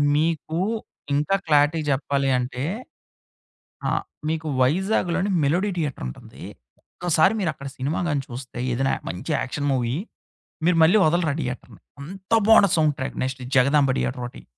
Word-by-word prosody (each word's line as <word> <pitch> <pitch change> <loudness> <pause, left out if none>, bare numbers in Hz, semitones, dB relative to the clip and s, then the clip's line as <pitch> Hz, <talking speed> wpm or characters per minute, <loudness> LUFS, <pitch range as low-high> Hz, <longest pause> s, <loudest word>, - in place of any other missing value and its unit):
మీకు 160 +1 0 0.6
ఇంకా 150 +7 +1
క్లారిటీ 150 +2 +4
చెప్పాలి 140 0 0
అంటే, 125 +1 -4 1.3
ఆహ్, - - 0 0.3
మీకు 160 0 -2
వైజాగ్‌లోని 185 +6 +1
'మెలోడీ 180 +8 +1
థియేటర్' 145 - -3
ఉంటుంది. 60 - -11 0.5
ఒక్క 175 - -5
సారి 190 +8 +5
మీరక్కడ 155 -7 -3
సినిమా 140 +5 -2
గాని 145 -2 0
చూస్తే, 125 -1 -8
ఏదైనా 135 +3 +1
య - - -11
మంచి 90 - -4
యాక్షన్ 145 +2 -3
మూవీ. 120 -1 0 0.7
మీరు 180 -1 +4
మళ్ళీ 180 +7 +6
వదలరా 160 -2 +1
థియేటర్‌ని. 125 - -6 0.2
అంత 190 +7 -10 0.2
బాగుండ 225 -2 +8
sound 155 -3 +3
track 130 - -4
next 130 0 -4
'Jagadamba 135 0 +4
theatre' 125 -1 -2
ఓటి. - - -14
145 Hz, 140 wpm, -23 LUFS, 130-165 Hz, 1.3 s, బాగుండ